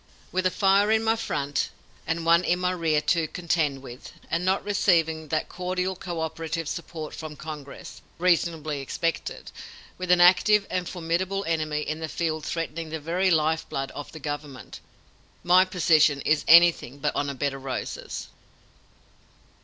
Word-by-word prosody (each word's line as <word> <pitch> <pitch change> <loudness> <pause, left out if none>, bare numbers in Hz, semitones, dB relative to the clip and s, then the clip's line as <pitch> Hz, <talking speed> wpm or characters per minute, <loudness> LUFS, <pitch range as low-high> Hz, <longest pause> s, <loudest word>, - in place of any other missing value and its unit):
With 185 0 +1
a - - +2
fire 195 +2 +3
in 220 0 +3
my 225 0 +2
front 145 -10 -2 0.4
and 165 0 -2
one 170 +1 +5
in 180 - +1
my 180 0 0
rear 165 -4 +1
to 165 0 +1
contend 155 -5 -1
with, 125 0 -10 0.2
and 170 +2 0
not 190 +1 +1
receiving 165 -6 +1
that 155 +1 -1
cordial 185 +1 -2
cooperative 165 -2 -4
support 160 -1 -6
from 155 -2 -7
Congress, 150 -2 -9 0.2
reasonably 165 -4 +1
expected, 165 +4 -3 0.5
with 185 0 -4
an 180 0 +5
active 190 +4 +5
and 180 -1 -2
formidable 185 +3 -2
enemy 155 -2 -1
in 155 +1 -4
the 160 -1 -4
field 155 -2 -2
threatening 165 0 -4
the 160 0 -4
very 175 +5 0
life 160 -1 +1
blood 135 0 -3
of 145 - -8
the 160 - -9
government, 145 -2 -6 0.6
my 180 +2 +6
position 160 -6 +3
is 150 +1 +1
anything 165 -6 +6
but 150 +1 -2
on 145 0 -1
a 140 - -5
bed 140 +1 -1
of 135 -1 -9
roses." 130 -1 -5
165 Hz, 160 wpm, -26 LUFS, 150-180 Hz, 0.6 s, my